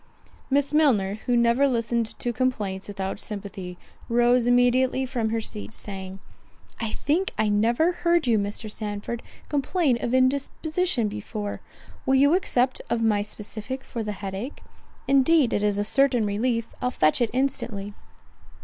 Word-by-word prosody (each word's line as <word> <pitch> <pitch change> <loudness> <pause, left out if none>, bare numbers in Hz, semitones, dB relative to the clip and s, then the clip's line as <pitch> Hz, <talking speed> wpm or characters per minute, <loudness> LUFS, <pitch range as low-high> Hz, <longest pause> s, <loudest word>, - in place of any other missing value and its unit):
Miss 280 +1 +1
Milner, 220 -10 +3
who 245 -1 +3
never 235 +4 +4
listened 235 -2 -1
to 240 - -2
complaints 215 -6 -1
without 195 -2 -4
sympathy, 195 -4 -7 0.3
rose 240 +1 +3
immediately 250 +2 +3
from 240 -4 -1
her 225 0 -1
seat, 215 0 -5
saying, 190 -2 -6 0.6
"I 225 - -2
think 335 - 0
I 215 - +2
never 235 +11 +3
heard 345 -2 +1
you, 230 -3 +3
Mr. 205 +2 -3
Sandford, 210 +2 -5 0.3
complain 285 -3 +1
of 240 +1 +1
indisposition 280 +1 +1
before. 210 0 -5 0.5
Will 265 - +4
you 285 +3 +5
accept 260 -8 +1
of 230 -1 0
my 210 -2 +3
specific 215 +5 -6
for 235 - -5
the 210 -1 -3
head 195 -1 -6
ache? 235 +9 -6 0.4
Indeed 275 0 +4
it 205 - +1
is 205 -1 +2
a 205 - +1
certain 250 0 +2
relief—I'll 230 +3 -1
fetch 155 -5 +2
it 235 - +2
instantly." 240 -6 -2
235 Hz, 150 wpm, -25 LUFS, 210-265 Hz, 0.6 s, you